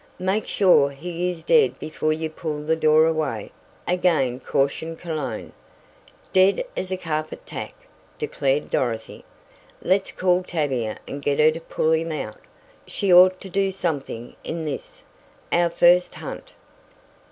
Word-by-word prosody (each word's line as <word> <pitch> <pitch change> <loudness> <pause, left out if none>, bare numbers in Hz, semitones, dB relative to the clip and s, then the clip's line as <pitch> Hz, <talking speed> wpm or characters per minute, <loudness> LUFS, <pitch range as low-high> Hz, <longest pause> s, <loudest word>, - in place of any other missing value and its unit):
"Make 190 +3 -1
sure 180 -8 +4
he 170 +5 -3
is 175 -2 -6
dead 465 -3 +4
before 155 0 -2
you 160 +1 -1
pull 155 -1 -5
the 160 +2 +1
door 155 0 +5
away," 155 -10 -1 0.4
again 170 -9 +1
cautioned 140 +5 -1
Cologne. 155 -5 -5 0.8
"Dead 190 - +4
as 185 - -3
a 185 - -2
carpet 155 - -4
tack," - - -7 0.4
declared 145 - -1
Dorothy. 115 -3 -2 0.6
"Let's 190 +2 +1
call 180 0 +2
Tavia 135 -11 -2
and 140 - -6
get 140 0 0
her 155 +1 +5
to 165 +1 -7
pull 160 -1 0
him 160 +1 +1
out. 125 -8 -5 0.5
She 195 -3 +1
ought 185 +1 +7
to 190 - -8
do 195 0 +1
something 145 -10 -4
in 165 -1 -4
this, - - -6 0.5
our 175 0 +3
first 175 +1 +4
hunt." - - -8
160 Hz, 140 wpm, -23 LUFS, 150-185 Hz, 0.8 s, ought